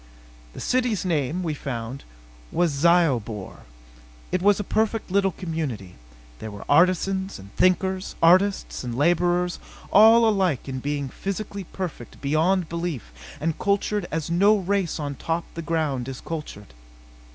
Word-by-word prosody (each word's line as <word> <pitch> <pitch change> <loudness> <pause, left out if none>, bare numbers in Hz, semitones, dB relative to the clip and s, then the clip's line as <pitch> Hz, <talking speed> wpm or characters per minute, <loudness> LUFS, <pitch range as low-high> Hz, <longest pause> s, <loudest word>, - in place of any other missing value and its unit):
The - - -9
city's 245 -7 0
name, 165 +1 0
we 160 -3 -1
found, 130 -2 -5 0.5
was 175 -2 +2
Zyobor. 140 - +1 0.7
It 185 - 0
was 205 +2 +4
a - - -1
perfect 220 0 -1
little 195 0 +3
community. 145 - -4 0.5
There 110 - -6
were 100 -1 -9
artisans 185 +4 +2
and 100 +1 -14
thinkers, 185 +1 +1
artists 185 +2 +3
and 120 -2 -4
laborers 175 +3 +2 0.3
all 225 +3 +7
alike 190 - +1
in 130 -1 -4
being 145 +1 -2
physically 195 +5 -5
perfect 170 -10 -7
beyond 160 +5 +1
belief 165 - -4 0.3
and 160 0 -2
cultured 200 -1 0
as 160 -1 -3
no 200 +5 +5
race 195 -3 -1
on 145 -2 -3
top 165 +5 -3
the 165 - -5
ground 155 -6 -1
is 135 -1 -6
cultured. 150 - -7
170 Hz, 140 wpm, -24 LUFS, 140-190 Hz, 0.7 s, all